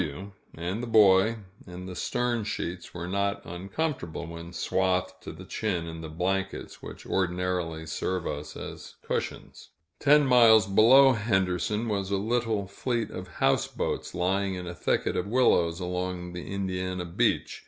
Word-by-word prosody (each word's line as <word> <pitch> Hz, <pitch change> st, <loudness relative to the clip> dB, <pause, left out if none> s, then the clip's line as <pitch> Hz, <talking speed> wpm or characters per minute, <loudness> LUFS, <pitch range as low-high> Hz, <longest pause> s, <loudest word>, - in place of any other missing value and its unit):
W 90 Hz, +7 st, -5 dB, 0.2 s
and 90 Hz, +7 st, -3 dB
the 120 Hz, -, -4 dB
Boy, 110 Hz, 0 st, +5 dB, 0.3 s
in 90 Hz, 0 st, -8 dB
the 90 Hz, -1 st, -7 dB
stern 120 Hz, +3 st, -1 dB
sheets, 90 Hz, -4 st, -4 dB
were 85 Hz, 0 st, -6 dB
not 100 Hz, +2 st, -1 dB
uncomfortable 90 Hz, -, -4 dB
when 85 Hz, +1 st, -8 dB
swathed 95 Hz, +1 st, 0 dB
to -, -, -7 dB
the 90 Hz, +4 st, -11 dB
chin 95 Hz, -3 st, -2 dB
in 80 Hz, 0 st, -7 dB
the 80 Hz, -, -7 dB
blankets 95 Hz, +4 st, -3 dB
which -, -, -10 dB
ordinarily 90 Hz, -3 st, -1 dB
serve 90 Hz, +2 st, -2 dB
us 75 Hz, +1 st, -5 dB
as -, -, -8 dB
cushions. -, -, -4 dB, 0.3 s
Ten 150 Hz, +1 st, +5 dB
miles 115 Hz, -5 st, +7 dB
below 120 Hz, +7 st, +7 dB
Henderson, 105 Hz, 0 st, 0 dB
was 100 Hz, -3 st, -1 dB
a 100 Hz, -, +1 dB
little 110 Hz, 0 st, 0 dB
fleet 115 Hz, +3 st, -2 dB
of 90 Hz, 0 st, -7 dB, 0.2 s
houseboats, -, -, 0 dB
lying 95 Hz, +2 st, 0 dB
in 90 Hz, 0 st, -6 dB
a 85 Hz, -, -5 dB
thicket -, -, 0 dB
of 90 Hz, -, -1 dB
willows 90 Hz, -8 st, +3 dB
along 90 Hz, -1 st, -3 dB
the 90 Hz, +1 st, -7 dB
Indiana 95 Hz, -2 st, -3 dB
beach. 85 Hz, -, 0 dB
95 Hz, 155 wpm, -27 LUFS, 90-105 Hz, 0.3 s, miles